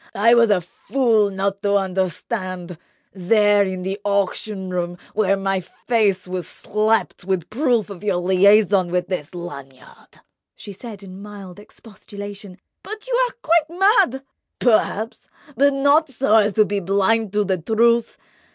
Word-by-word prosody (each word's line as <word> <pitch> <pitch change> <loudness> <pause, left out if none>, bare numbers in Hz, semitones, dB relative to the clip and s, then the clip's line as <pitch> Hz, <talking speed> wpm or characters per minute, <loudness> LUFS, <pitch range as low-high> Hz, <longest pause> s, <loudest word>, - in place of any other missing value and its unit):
I 230 +4 +4
was 235 -1 +5
a 200 -3 +3
fool 220 +3 0
not 195 0 -3
to 200 0 +1
understand, 185 -1 -3 0.3
there 205 +2 +3
in 185 -2 -4
the 195 +2 -4
auction 200 -1 -2
room, 175 -1 -3 0.2
when 195 -2 +1
my 195 -1 0
face 200 0 -1
was 180 -2 -4
slapped 215 0 -1
with 185 -2 -3
proof 240 -4 0
of 190 0 -10
your 200 -3 0
liaison 190 +1 +3
with 180 0 -2
this 180 -3 -5
Lanyard!" 140 -7 -11 0.3
She 205 - -10
said 210 0 -10
in 190 0 -11
mild 200 -3 -10
expostulation: 205 -2 -11 0.2
"But 430 +1 -8
you - - -3 0.2
are - - -17
quite 335 +1 +1
mad." 385 - +3 0.3
"Perhaps—but 245 +5 0
not 285 +3 +3
so 265 -3 0
as 210 -2 +4
to 215 - +4
be 205 0 -2
blind 200 +3 +1
to 210 0 +2
the 190 -2 -1
truth. 230 +5 +1
200 Hz, 145 wpm, -21 LUFS, 185-225 Hz, 0.3 s, was